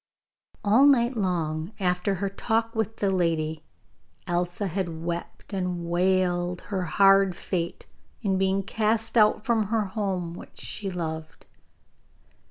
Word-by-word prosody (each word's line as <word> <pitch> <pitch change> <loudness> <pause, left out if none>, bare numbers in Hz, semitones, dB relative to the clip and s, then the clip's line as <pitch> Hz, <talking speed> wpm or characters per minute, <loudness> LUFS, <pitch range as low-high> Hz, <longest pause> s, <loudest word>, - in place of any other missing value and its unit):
All 225 +7 +6
night 250 -2 +4
long 170 -3 -1
after 180 +1 +1
her 200 +2 -2
talk 225 +3 -1
with 220 -1 -2
the 200 -1 +1
lady 160 -4 0 0.6
Elsa 175 +2 -1
had 170 -3 -3
wept 170 +4 -5
and 180 -3 -2
wailed 180 0 +1
her 190 - 0
hard 195 +2 +5
fate 170 -2 -3 0.4
in 190 -2 +1
being 195 +1 +2
cast 220 +2 0
out 215 -1 +4
from 225 -3 +2
her 220 0 +1
home 190 -4 -2
which - - -11
she 200 -2 -4
loved. 160 -3 -5
190 Hz, 130 wpm, -26 LUFS, 175-210 Hz, 0.6 s, All